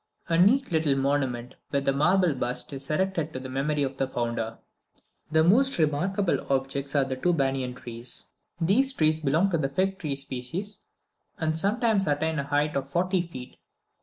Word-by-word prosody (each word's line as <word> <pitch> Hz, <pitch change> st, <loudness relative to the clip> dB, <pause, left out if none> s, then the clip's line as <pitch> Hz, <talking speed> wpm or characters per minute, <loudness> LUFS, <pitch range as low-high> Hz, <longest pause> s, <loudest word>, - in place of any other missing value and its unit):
A 165 Hz, -, +2 dB
neat 225 Hz, +10 st, +4 dB
little 160 Hz, -4 st, +2 dB
monument, 135 Hz, -3 st, -1 dB, 0.2 s
with 140 Hz, 0 st, -1 dB
a 135 Hz, -, +4 dB
marble 180 Hz, +4 st, +3 dB
bust, 125 Hz, +1 st, -3 dB
is 135 Hz, 0 st, -6 dB
erected 165 Hz, -1 st, -1 dB
to 130 Hz, -, -3 dB
the 130 Hz, 0 st, -7 dB
memory 145 Hz, +3 st, 0 dB
of 135 Hz, 0 st, -3 dB
the 135 Hz, -, 0 dB
founder. 115 Hz, -3 st, -3 dB, 0.7 s
The 160 Hz, 0 st, +4 dB
most 260 Hz, +11 st, +4 dB
remarkable 175 Hz, +5 st, +1 dB
objects 135 Hz, +1 st, -1 dB
are 140 Hz, -, +4 dB
two 175 Hz, +7 st, +1 dB
banana 135 Hz, -4 st, 0 dB
trees. 120 Hz, 0 st, -3 dB, 0.3 s
These 235 Hz, +11 st, +3 dB
trees 155 Hz, -7 st, +2 dB
belong 160 Hz, +6 st, +2 dB
to 165 Hz, -, +1 dB
the 135 Hz, -, 0 dB
fig 190 Hz, +5 st, 0 dB
tree 145 Hz, -4 st, -2 dB
species, 140 Hz, +10 st, -5 dB, 0.6 s
and 160 Hz, -1 st, 0 dB
sometimes 205 Hz, +2 st, +1 dB
attain 150 Hz, +1 st, 0 dB
a -, -, -1 dB
height 145 Hz, +2 st, 0 dB
of 135 Hz, 0 st, -2 dB
forty 180 Hz, +4 st, +1 dB
feet. 130 Hz, -7 st, -9 dB
150 Hz, 170 wpm, -27 LUFS, 135-180 Hz, 0.7 s, neat